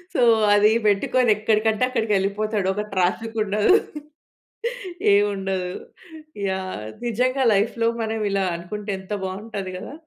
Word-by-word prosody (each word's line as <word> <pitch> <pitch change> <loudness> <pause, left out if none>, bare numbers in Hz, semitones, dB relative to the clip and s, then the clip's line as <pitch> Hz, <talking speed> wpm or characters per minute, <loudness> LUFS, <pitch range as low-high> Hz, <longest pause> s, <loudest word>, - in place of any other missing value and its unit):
So, - - +2 0.3
అది 210 +1 +5 0.2
పెట్టుకొని 220 +4 +2
ఎక్కడికంటే 215 +1 +1
అక్కడికెళ్ళిపోతాడు. 210 -3 0
ఒక 210 +2 -2
ట్రాఫిక్ 210 +5 -1
ఉండదు. 210 - +3 1.4
ఏవుండదు. 195 -3 0 0.8
యాహ్! 185 - -4 0.2
నిజంగా 255 +3 +1
లైఫ్‌లో 225 +3 +1
మనం 220 0 -2
ఇలా 195 0 +1
అనుకుంటే 205 +4 -6
ఎంత 190 +2 -14
బాగుంటది 195 0 -5
కదా! 185 - -8
205 Hz, 105 wpm, -23 LUFS, 195-220 Hz, 1.4 s, అది